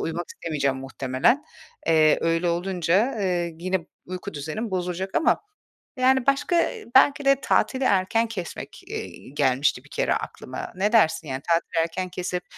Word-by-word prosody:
uyumak 170 +2 -3
istemeyeceğim 140 -4 -2
muhtemelen. 135 - 0 0.4
Eee, 155 -1 +5
öyle 165 +1 +1
olunca, 185 - +1
eee, 175 -3 -1
yine 185 +1 -1 0.3
uyku 185 +1 -6
düzenim 160 +11 -4
bozulacak 185 +1 -2
ama, - - +3 0.6
yani, 260 0 +3
başka 290 +5 +2 0.4
belki 280 +2 +5
de 275 0 +4
tatili 260 0 +1
erken 205 +2 +2
kesmek, 185 -7 -7
eee, - - -7
gelmişti 140 0 +1
bir - - -19
kere - - 0
aklıma. - - -6
Ne 205 +4 +1
dersin 165 -7 +3
yani 130 0 -4
tatili 165 0 +2
erken 180 +3 -3
kesip 180 0 -3
180 Hz, 145 wpm, -24 LUFS, 165-220 Hz, 0.6 s, Eee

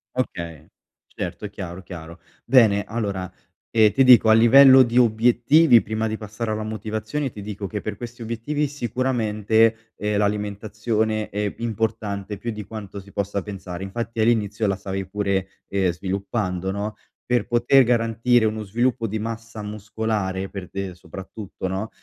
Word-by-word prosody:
Okay. 85 - -4 0.4
Certo, - - -6
è - - -9
chiaro, 95 -2 -7
chiaro. 85 -2 -10 0.2
Bene, 110 -5 +5
allora, 100 -5 -3 0.4
ehm, 110 -2 +4
ti 135 - +4
dico 125 -3 +7
a 110 - +7
livello 130 +4 +8
di 120 0 +1
obiettivi 120 +4 +5
prima 110 0 -2
di 110 0 -3
passare 110 +2 -5
alla 110 0 -2
motivazione 110 +5 -3
ti 105 - -10
dico 100 0 -5
che 105 +2 -4
per 105 -1 -5
questi 120 +2 -9
obiettivi 115 +7 -2
sicuramente, 115 -4 0
ehm, 105 0 -1
l'alimentazione 105 +1 -1
è 105 0 -2
importante 110 -3 -3
più 115 +4 -4
di 105 -2 -6
quanto 100 -2 -8
si 100 +1 -16
possa 100 0 -2
pensare. 95 -2 -7
Infatti 115 +3 -4
all'inizio 110 -1 +1
la 100 -1 0
stavi 95 0 -4
pure, 100 -1 -1 0.2
ehm, 95 -2 +1
sviluppando, 95 0 -3
no, 100 +2 -3 0.3
per 120 -3 0
poter 120 +3 +4
garantire 115 0 +2
uno 110 0 -1
sviluppo 115 +3 0
di 110 +1 -3
massa 115 0 -6
muscolare 105 -2 -3
per 95 -3 -7
te 95 -2 -5
soprattutto, 95 +2 -8
no, 95 +4 -3
110 Hz, 155 wpm, -23 LUFS, 100-115 Hz, 0.4 s, livello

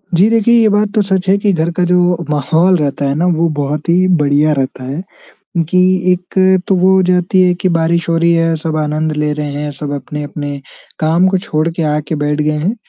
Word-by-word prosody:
जी, 195 +6 +4
देखिए 230 +1 +2
ये 220 - +4
बात 205 0 +1
तो 210 - +3
सच 190 -1 -1
है 200 - +4
कि 200 0 0
घर 160 0 0
का 180 - +2
जो 175 -1 +1
माहौल 160 +5 +2
रहता 145 -1 -2
है 140 +1 -1
ना 170 - 0
वो 170 +1 +1
बहुत 145 +3 -3
ही 185 +2 +3
बढ़िया 145 +1 +2
रहता 130 -1 -3
है 140 +8 -5 0.7
कि 185 - +2 0.3
एक 185 +1 +1
तो 195 - +2
वो 185 +1 +3
हो 190 - +4
जाती 180 +1 +1
है 180 -1 +3
कि 185 - +1
बारिश 170 0 0
हो 165 - +1
रही 170 +1 +2
है। 165 -1 +1
सब 155 0 -4
आनंद 155 +1 -1
ले 150 0 0
रहे 150 -1 -4
हैं। 150 +1 -4
सब 145 0 -7
अपने-अपने 145 0 -6 0.4
काम 165 +4 +2
को 190 0 +1
छोड़ 160 -4 -2
के 165 0 -4
आके 150 +1 -2
बैठ 145 +1 -1
गए 150 0 0
हैं। 185 +10 -2
165 Hz, 225 wpm, -14 LUFS, 150-185 Hz, 0.7 s, जी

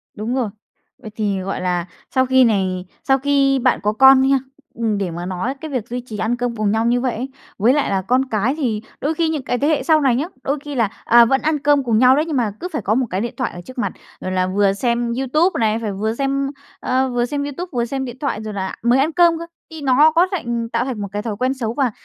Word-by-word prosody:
Đúng 225 +5 -3
rồi. 240 -5 0 0.5
Vậy 215 - -9
thì, 205 -3 -1
gọi 190 0 -4
là, 180 -1 -1 0.3
sau 260 0 +4
khi 260 0 +5
này 190 -5 +1 0.2
sau 270 -1 +3
khi 275 -1 +2
bạn 255 +1 +2
có 210 - +1
con 265 +3 +7
đi 265 - +3
ha, 275 - +4 0.4
ừm, 220 -3 -1
để 190 -4 -2
mà 175 +1 -5
nói 185 +8 -2
cái 315 -2 -6
việc 245 -3 -3
duy 245 +1 -3
trì 220 -4 -7
ăn 220 +3 0
cơm 245 -1 -2
cùng 215 -2 0
nhau 225 +1 +1
như 245 +1 +2
vậy 255 -2 -1
ấy, 250 +4 -4 0.3
với 230 +6 +4
lại 295 - +1
là 195 -1 0
con 255 +7 +1
cái 220 +4 +1
thì 230 -8 -1 0.2
đôi 300 +3 0
khi 325 0 0
những 305 -4 -2
cái 245 - -1
thế 285 - 0
hệ 310 -2 +1
sau 315 -2 +4
này 265 -4 +3
nhá, 275 +6 0 0.2
đôi 280 +2 -1
khi 290 -1 -5
là, 230 -4 +3 0.2
à, 235 0 +7
vẫn 270 +3 +1
ăn 305 -1 0
cơm 290 -1 +3
cùng 230 -3 +1
nhau 255 +1 +6
đấy, 300 +3 +1
nhưng 310 -5 -2
mà 225 -4 +1
cứ 360 - -4
phải 300 - -2
có 215 +3 0
một 260 - +1
cái 185 +2 -2
điện 235 - -3
thoại 255 - -1
ở 175 - -8
trước 255 - -12
mặt, 245 - -1 0.3
rồi 185 - -4
là 185 0 +1
vừa 195 +1 +2
xem 235 +2 -1
YouTube 305 +7 +1
này, 220 0 +1
phải 220 -3 -3
vừa 215 +3 -2
xem, 275 +1 0 0.3
ờ, 260 +1 0
vừa 245 -1 0
xem 285 +3 -3
YouTube 290 +6 -5
vừa 235 -1 0
xem 265 +2 -3
điện 245 0 -8
thoại 275 -7 -2
rồi 215 -1 -5
là 190 -1 -4
mới 245 +2 +4
ăn 305 +4 +2
cơm 340 -1 +4
cơ, 335 - -6 0.3
thì 320 - -8
nó 285 +3 +5
có 350 +2 +5
thành 235 -10 -2
tạo 235 +2 -1
thành 245 -6 -4
một 200 - -3
cái 205 0 -3
thói 220 -2 -4
quen 255 +2 0
xấu? 235 -4 -3
Và 260 -2 +1
245 Hz, 280 wpm, -20 LUFS, 215-275 Hz, 0.5 s, con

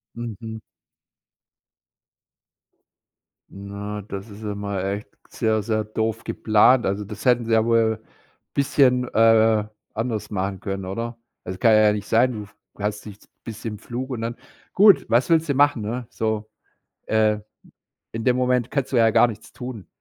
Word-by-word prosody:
Mhm. 110 -1 -6 2.9
Na, 100 +1 -6
das 100 +1 -7
ist 105 +2 -11
ja 105 -1 -3
mal 100 -1 -3
echt 100 +2 -3 0.2
sehr, 110 -2 0
sehr 110 -1 0
doof 110 +1 -2
geplant. 115 +3 +3
Also, 100 +2 -1
das 105 +1 -9
hätten 125 -2 +3
sie 115 - -1
ja 110 0 +4
wohl 115 -1 +2 0.5
bisschen, 125 -3 +2
äh, 110 -1 +4 0.3
anders 115 -1 -3
machen 95 -1 -3
können, 95 -1 -4
oder? 115 +5 -5 0.2
Das 90 0 -6
kann 115 +4 +4
ja 105 -1 +5
nicht 105 0 -4
sein, 125 +3 +3
du 105 -3 -5
f 100 - -19 0.2
hast 105 +1 -3
dich 105 -1 -10 0.2
bist 110 0 -8
im 105 -2 -4
Flug 125 +5 -6
und 120 -3 -3
dann 115 +1 -3 0.4
Gut, 200 0 +6
was 120 +3 +3
willst 165 -1 +3
du 140 - +1
machen, 145 -4 +3
ne? 120 +3 -4
So, 110 -1 -2 0.6
äh, 110 -1 +2 0.7
in 115 0 -4
dem 125 -1 +3
Moment 125 -1 +1
kannst 140 -2 -2
du - - +1
ja 115 - +5
gar 120 - +5
nichts 110 0 -9
tun. 125 -7 -7
110 Hz, 160 wpm, -23 LUFS, 105-120 Hz, 2.9 s, Gut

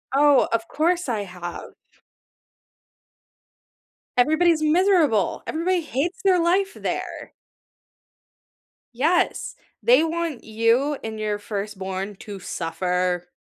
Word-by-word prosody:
Oh, 290 0 +5
of 230 0 0
course, 340 0 0
I 220 -3 -1
have. 180 -2 -8 2.5
Everybody's 315 +5 +3
miserable. 310 - +3
Everybody 350 +3 0
hates 330 - -3
their 375 -2 +4
life 380 +4 +2
there. - - -5 1.6
Yes. 305 +9 +1 0.3
They 475 -8 +5
want 330 -4 -3
you 230 +6 +1
and 220 -1 -5
your 210 -1 -1
firstborn 200 -1 -5
to 205 -1 -9
suffer. 180 +1 -2
260 Hz, 95 wpm, -23 LUFS, 205-335 Hz, 2.5 s, Oh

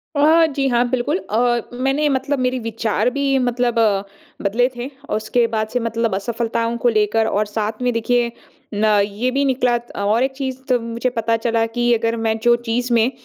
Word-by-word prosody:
अ, 315 +3 +5
जी। 275 -1 +1
हाँ, 245 -1 +2
बिल्कुल 255 +6 0
अ, 240 - +1
मैंने 270 +4 0
मतलब 270 +1 -1
मेरे 255 0 0
विचार 225 +1 -1
भी 275 0 0
मतलब 245 -1 0
अ, 205 -3 +2 0.4
बदले 225 +5 +2
थे 245 +2 -5 0.2
औ - - 0
उसके 220 +2 +1
बाद 215 0 0
से 250 - +1
मतलब 230 -3 -1
असफ़लताओं 230 +2 -2
को 240 +1 +2
लेकर 220 0 +2
और 210 0 0
साथ 215 +2 -3
में 250 - +1
देखिए 235 +1 +1 0.4
न 210 +1 +1 0.2
ये 215 +5 -2
भी 280 +2 +1
निकला 250 -2 +2
त 240 0 -12
और 210 +4 +2
एक 265 - 0
चीज़ 265 -2 -3
तब 245 -2 +2
मुझे 235 +2 -1
पता 230 -1 0
चला 230 -1 +2
कि 240 0 +3
अगर 230 0 0
मैं 220 0 +1
जो 240 0 +5
चीज़ 240 +2 -1
में 235 +2 +3
240 Hz, 200 wpm, -20 LUFS, 225-255 Hz, 0.4 s, अ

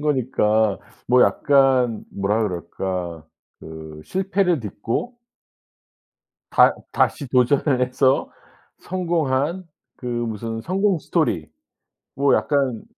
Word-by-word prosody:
거니까 110 -7 +1 0.3
뭐 125 0 +5
약간 130 -5 +3
뭐라 105 +3 0
그럴까. 85 -3 -4 0.3
그 80 -1 -10
실패를 190 -3 0
딛고 115 - -4 1.3
다 - - +5 0.2
다시 140 -4 0
도전을 130 +1 +2
해서 130 +1 +1 0.5
성공한 170 -2 -1 0.3
그 125 - -10
무슨 115 -2 -3
성공 190 +1 +1
스토리. 125 - -1 0.7
뭐 140 0 +3
약간 135 -6 0
125 Hz, 180 characters per minute, -22 LUFS, 105-150 Hz, 1.3 s, 뭐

